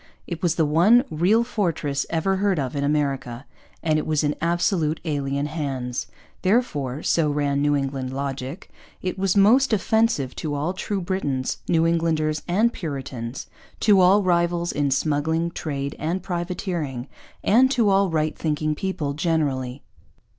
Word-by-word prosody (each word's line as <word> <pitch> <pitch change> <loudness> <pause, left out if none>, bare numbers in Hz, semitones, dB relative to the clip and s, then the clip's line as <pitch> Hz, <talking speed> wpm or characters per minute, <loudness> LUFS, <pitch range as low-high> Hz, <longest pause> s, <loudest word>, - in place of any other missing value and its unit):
It 170 -2 -6
was 170 -2 +1
the 160 - +2
one 180 +12 +5
real 185 +9 +3
fortress 170 - -1
ever 190 +4 0
heard 195 -2 +1
of 135 -1 -2
in 140 - -1
America, 140 -4 -1 0.4
and 155 -1 +2
it - - -4
was 155 -1 +1
in 145 0 +1
absolutely 165 -2 0
alien 140 0 -1
hands; 135 -5 -3 0.3
therefore, 160 - 0
so 160 -3 +2
ran 145 -1 0
New 145 0 +2
England 135 -2 -2
logic, 135 +2 -5 0.3
it 185 +1 -3
was 195 0 +1
most 235 +6 +5
offensive 220 - +1
to 150 -2 -3
all 150 +6 -1
true 195 +1 -3
Britons, 145 -8 -2
New 165 -1 +3
Englanders, 160 -2 +1
and 215 +7 +2
Puritans; 135 -6 -5 0.4
to 205 -3 +5
all 190 +3 +5
rivals 175 -1 +1
in 145 -1 0
smuggling, 160 +4 0
trade, 140 -4 -4
and 170 +4 -2
privateering; 175 -7 -3 0.4
and 250 +5 +5
to 235 -6 +2
all 195 0 +3
right 155 -1 0
thinking 155 -1 -1
people 150 -4 -3
generally. 145 -5 -1
160 Hz, 150 wpm, -23 LUFS, 140-185 Hz, 0.4 s, one